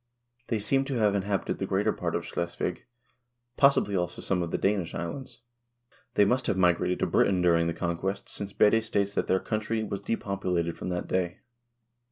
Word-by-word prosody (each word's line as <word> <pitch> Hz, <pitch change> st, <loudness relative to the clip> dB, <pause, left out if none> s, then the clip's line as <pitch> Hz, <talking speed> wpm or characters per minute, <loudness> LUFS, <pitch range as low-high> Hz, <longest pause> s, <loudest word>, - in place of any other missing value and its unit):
l 120 Hz, 0 st, -47 dB
They 115 Hz, -, 0 dB
seem 135 Hz, +6 st, +1 dB
to 135 Hz, -1 st, -3 dB
have 105 Hz, -4 st, +3 dB
inhabited 100 Hz, 0 st, -1 dB
the -, -, -2 dB
greater -, -, +1 dB
part -, -, -3 dB
of -, -, -2 dB
Schleswig, 85 Hz, +1 st, -3 dB, 0.7 s
possibly 140 Hz, -8 st, +4 dB
also 90 Hz, -1 st, -2 dB
some 90 Hz, -2 st, 0 dB
of 85 Hz, -, -2 dB
the -, -, -1 dB
Danish 95 Hz, -4 st, 0 dB
islands. 125 Hz, +11 st, -6 dB, 0.7 s
They 105 Hz, -, +6 dB
must 125 Hz, +4 st, +1 dB
have 95 Hz, -, +1 dB
migrated 90 Hz, 0 st, +2 dB
to -, -, +3 dB
Britain 95 Hz, -2 st, +3 dB
during 85 Hz, -1 st, +4 dB
the -, -, 0 dB
conquest, 90 Hz, +3 st, -2 dB
since 100 Hz, -1 st, -6 dB
Bede 110 Hz, +2 st, +4 dB
states 100 Hz, -3 st, 0 dB
that -, -, -1 dB
their 95 Hz, -, +3 dB
country 110 Hz, +2 st, -2 dB
was 100 Hz, -2 st, -3 dB
depopulated 95 Hz, -5 st, -2 dB
from -, -, -5 dB
that 90 Hz, -1 st, -3 dB
day. 90 Hz, -1 st, -1 dB
100 Hz, 190 wpm, -28 LUFS, 90-110 Hz, 0.7 s, They